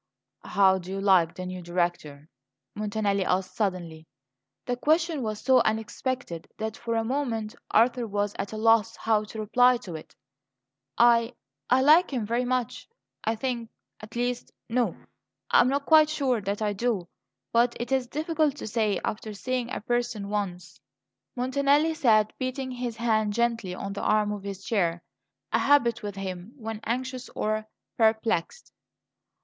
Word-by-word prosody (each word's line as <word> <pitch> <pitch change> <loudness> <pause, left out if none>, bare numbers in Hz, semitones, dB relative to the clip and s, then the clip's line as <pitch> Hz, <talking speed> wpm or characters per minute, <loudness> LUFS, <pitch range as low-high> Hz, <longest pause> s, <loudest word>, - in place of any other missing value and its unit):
"How 190 -1 +4
do 180 0 -10
you 195 - -3
like 185 -4 +3
the 185 - -6
new 185 0 -6
Director?" 175 -4 -2 0.5
Montanelli 205 -2 -1
asked 185 0 -1
suddenly. 175 -6 -3 0.6
The 245 - -1
question 315 +3 +1
was 215 -3 -3
so 260 0 +5
unexpected 220 -3 -2
that, 220 0 -3
for 230 -1 -3
a 225 - +1
moment, 230 -4 -2 0.2
Arthur 235 +1 +3
was 205 0 -1
at 200 - -3
a 215 - -5
loss 225 0 +3
how 215 -1 +1
to 220 +1 -8
reply 245 +4 +4
to 175 - -7
it. 155 - -10 0.8
"I 235 0 +4 0.3
I 255 +1 +4
like 315 +6 +6
him 245 -5 -1
very 235 +3 0
much, 250 -2 -2 0.4
I 225 - +1
think 235 -1 -3 0.3
at 215 +2 -12
least 245 0 -2 0.2
no, 245 0 0 0.6
I - - +6
am - - +3
not 280 +1 -1
quite 310 -1 +6
sure 265 -7 0
that 200 +2 -2
I 210 -1 0
do. 205 -4 -1 0.5
But 235 +1 +3
it 240 +2 -4
is 260 -2 +1
difficult 310 +1 0
to - - -7
say, 215 -3 0
after 215 0 -4
seeing 250 +2 -2
a - - -4
person 240 -3 -2
once." 185 -4 -4 0.6
Montanelli 280 +5 +2
sat 215 -8 +3
beating 260 0 -3
his 245 -2 -4
hand 220 -2 +1
gently 230 -5 0
on 195 +1 -5
the 200 - -5
arm 210 -1 +2
of 205 -1 -4
his 200 0 -7
chair; 175 -7 0 0.5
a - - +4
habit 255 -5 +3
with 205 -1 -5
him 190 +2 -6
when 225 -3 -5
anxious 255 +2 -3
or 215 0 -1 0.3
perplexed. 220 - +1
225 Hz, 160 wpm, -27 LUFS, 200-250 Hz, 0.8 s, like